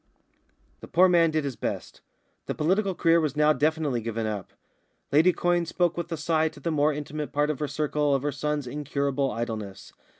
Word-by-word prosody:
The -, -, -11 dB
poor 185 Hz, +2 st, +5 dB
man 170 Hz, -2 st, +4 dB
did 155 Hz, -1 st, 0 dB
his 140 Hz, -3 st, -3 dB
best. -, -, -5 dB, 0.5 s
The -, -, -2 dB
political 190 Hz, +5 st, +1 dB
career 165 Hz, 0 st, +4 dB
was 150 Hz, -3 st, -1 dB
now 150 Hz, 0 st, +4 dB
definitely 150 Hz, -5 st, 0 dB
given 115 Hz, 0 st, -3 dB
up. 105 Hz, -3 st, -4 dB, 0.6 s
Lady 160 Hz, +6 st, +5 dB
Quyne 175 Hz, -1 st, 0 dB
spoke 175 Hz, 0 st, +1 dB
with 170 Hz, 0 st, -5 dB
a 165 Hz, -, -2 dB
sigh 160 Hz, +1 st, +1 dB
to 145 Hz, -, -15 dB
the 165 Hz, +4 st, -2 dB
more 150 Hz, 0 st, +2 dB
intimate 150 Hz, 0 st, -5 dB
part 150 Hz, +1 st, +1 dB
of 145 Hz, -, -6 dB
her 150 Hz, -, -1 dB
circle 150 Hz, 0 st, 0 dB
of 135 Hz, -, -2 dB
her 145 Hz, -, 0 dB
son's 150 Hz, 0 st, -2 dB
incurable 140 Hz, 0 st, -1 dB
idleness. 110 Hz, -4 st, -5 dB
150 Hz, 195 wpm, -26 LUFS, 140-160 Hz, 0.6 s, poor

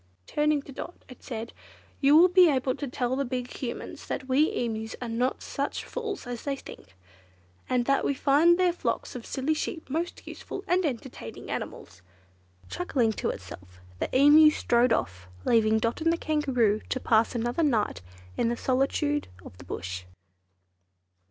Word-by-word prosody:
Turning 295 Hz, -1 st, +1 dB
to 280 Hz, -, -11 dB
Dot 340 Hz, +6 st, -9 dB
it 255 Hz, -, -13 dB
said, 230 Hz, -1 st, -6 dB, 0.5 s
"You 285 Hz, +2 st, +6 dB
will 350 Hz, +3 st, +8 dB
be 360 Hz, -1 st, +6 dB
able 260 Hz, -2 st, +1 dB
to 285 Hz, -, -5 dB
tell 245 Hz, 0 st, -1 dB
the 275 Hz, -, 0 dB
big 250 Hz, -1 st, -4 dB
Humans 240 Hz, -3 st, -6 dB
that 260 Hz, -, -4 dB
we 275 Hz, +4 st, +3 dB
Emus 220 Hz, -2 st, -3 dB
are 245 Hz, -, -5 dB
not 240 Hz, +3 st, -1 dB
such 280 Hz, +1 st, -3 dB
fools 445 Hz, -, -5 dB
as 245 Hz, -1 st, -5 dB
they 280 Hz, -1 st, -2 dB
think, 265 Hz, -, -13 dB, 0.7 s
and 250 Hz, -1 st, +1 dB
that 275 Hz, +1 st, +2 dB
we 280 Hz, -, 0 dB
find 305 Hz, +6 st, +4 dB
their 365 Hz, -1 st, +3 dB
flocks 350 Hz, -, -3 dB
of 240 Hz, -, -7 dB
silly 275 Hz, +4 st, 0 dB
sheep 315 Hz, +1 st, -4 dB
most 335 Hz, +4 st, -3 dB
useful 385 Hz, -, -7 dB
and 365 Hz, -1 st, +2 dB
entertaining 240 Hz, -, -7 dB
animals." 90 Hz, +1 st, -6 dB, 0.7 s
Chuckling 265 Hz, -10 st, 0 dB
to -, -, -2 dB
itself, 90 Hz, -1 st, -9 dB, 0.2 s
the -, -, -1 dB
Emu 295 Hz, +3 st, +8 dB
strode 245 Hz, -5 st, +2 dB
off, 95 Hz, -, -1 dB, 0.2 s
leaving 220 Hz, -1 st, +4 dB
Dot 230 Hz, +6 st, -1 dB
and 330 Hz, +1 st, +3 dB
the 335 Hz, -, 0 dB
Kangaroo 260 Hz, -10 st, +1 dB
to 255 Hz, -, -1 dB
pass 230 Hz, -1 st, +2 dB
another 240 Hz, +6 st, -1 dB
night 220 Hz, -, +1 dB, 0.3 s
in 230 Hz, -, +1 dB
the 240 Hz, -, -2 dB
solitudes 275 Hz, +4 st, 0 dB, 0.2 s
of -, -, -11 dB
the -, -, -10 dB
Bush. 90 Hz, +1 st, -5 dB
260 Hz, 170 wpm, -27 LUFS, 230-300 Hz, 0.7 s, will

